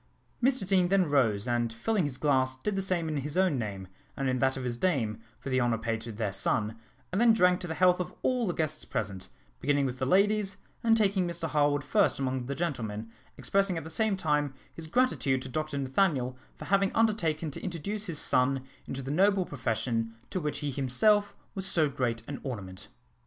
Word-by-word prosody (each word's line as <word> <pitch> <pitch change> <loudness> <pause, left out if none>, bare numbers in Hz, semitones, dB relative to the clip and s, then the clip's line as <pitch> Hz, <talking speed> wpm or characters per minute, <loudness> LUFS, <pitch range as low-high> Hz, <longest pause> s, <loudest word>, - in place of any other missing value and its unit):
Mr 255 -5 +2
Deane 185 -2 +3
then 190 -1 +3
rose, 115 -7 +2
and 120 -1 0
filling 180 - 0
his 135 -3 -3
glass, 130 -3 +1
did 200 +10 -2
the 195 - 0
same 185 -4 0
in 155 -1 -2
his 145 +4 -3
own 185 -8 +3
name, 100 -4 -4 0.3
and 135 - -1
in 130 -1 +1
that 135 +1 +2
of 130 - -4
his 125 -1 -2
dame, 120 -8 0 0.2
for 135 - -6
the 130 0 +3
honour 120 -2 +2
paid 115 0 -2
to 115 +1 -6
their 105 -2 -3
son, 105 +2 0 0.4
and 190 +4 +1
then 235 -1 +7
drank 180 -4 +4
to 180 - -5
the 160 - -3
health 180 0 +4
of 180 - -3
all 250 -3 +1
the 175 - 0
guests 155 -2 -1
present, 100 -3 -4 0.3
beginning 140 0 +2
with 125 -1 -3
the 130 - 0
ladies, 200 +2 +2 0.3
and 225 -1 +5
taking 195 -4 +2
Mr 170 -1 -3
Harwood 145 -1 +2
first 200 +7 +2
among 130 -2 -2
the 140 - -3
gentlemen, 115 -9 -3 0.3
expressing 195 -3 +1
at 165 - -4
the 160 - -9
same 215 +2 +1
time 150 -5 0 0.2
his 165 -1 -8
gratitude 155 - +1
to 130 - -7
Dr 155 +2 -3
Nathaniel 135 -2 +1 0.2
for - - -8
having 195 0 +2
undertaken 170 -9 +1
to - - -7
introduce 200 +5 -4
his 165 -4 -3
son 130 -2 +2 0.2
into 135 0 -4
the 135 - -4
noble 190 +3 +3
profession 115 -4 -2 0.2
to 185 - -1
which 150 -2 -3
he 145 -1 -2
himself 145 +11 +2 0.2
was 190 -1 -3
so 160 -5 +3
great 125 -5 -2
an 140 - -5
ornament. 100 -8 -6
145 Hz, 210 wpm, -29 LUFS, 125-185 Hz, 0.4 s, then